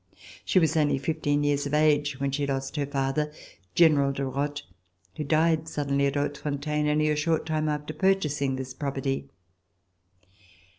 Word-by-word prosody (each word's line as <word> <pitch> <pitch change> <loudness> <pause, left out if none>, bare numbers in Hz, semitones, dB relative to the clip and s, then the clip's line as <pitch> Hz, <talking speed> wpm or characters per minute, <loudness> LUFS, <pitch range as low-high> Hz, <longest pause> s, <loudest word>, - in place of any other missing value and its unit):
She - - 0
was 160 -2 +3
only 150 -3 +2
fifteen 145 0 0
years 145 0 +1
of 145 - -1
age 145 -2 +2
when 140 0 -1
she 140 +1 -1
lost 135 0 -3
her 145 -2 -1
father, 140 +2 -1 0.4
General 150 -5 +5
de 135 0 -3
Rothe, 145 +2 -2 0.5
who 150 - -3
died 160 +2 +2
suddenly 140 -1 0
at 140 - -2
Hautefontaine, 150 +1 -1
only 155 +1 +2
a - - +1
short 160 +2 0
time 155 -1 0
after 150 +1 -3
purchasing 150 -7 +1
this 130 -1 -6
property. 135 -1 -3
145 Hz, 155 wpm, -27 LUFS, 140-155 Hz, 0.5 s, General